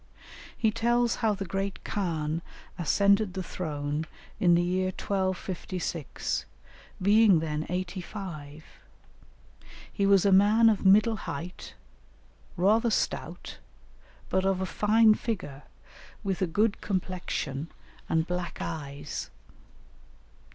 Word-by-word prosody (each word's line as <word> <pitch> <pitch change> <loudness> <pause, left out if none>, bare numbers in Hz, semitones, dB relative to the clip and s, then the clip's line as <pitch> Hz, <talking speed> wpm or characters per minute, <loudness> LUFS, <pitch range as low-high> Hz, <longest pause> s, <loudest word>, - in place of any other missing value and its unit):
He 220 -2 +2
tells 235 +1 +1
how 220 -3 +1
the 195 0 -5
great 195 +2 -3
khan 165 -5 -2 0.4
ascended 200 +3 +3
the 190 - -2
throne 150 -3 -3 0.3
in 175 -2 +5
the 175 - +3
year 185 +1 0
1256, 185 -3 -3 0.5
being 205 0 +5
then 155 -1 -2
eighty 180 +1 -3
five; 160 -7 -8 1.3
he 200 -1 +1
was 195 -1 +5
a 200 - +4
man 210 +4 +6
of 210 -3 0
middle 210 +3 +5
height, 175 +1 -7 0.8
rather 215 +6 +3
stout, - - -3 0.7
but 190 - +1
of 190 -1 +1
a 190 - -1
fine 215 +3 +4
figure, 180 - -4 0.6
with 195 -2 -2
a 185 - +2
good 210 +6 +1
complexion 180 -6 -3 0.4
and 160 0 +2
black 180 -1 -4
eyes. 145 -4 -5
185 Hz, 110 wpm, -28 LUFS, 165-205 Hz, 1.3 s, man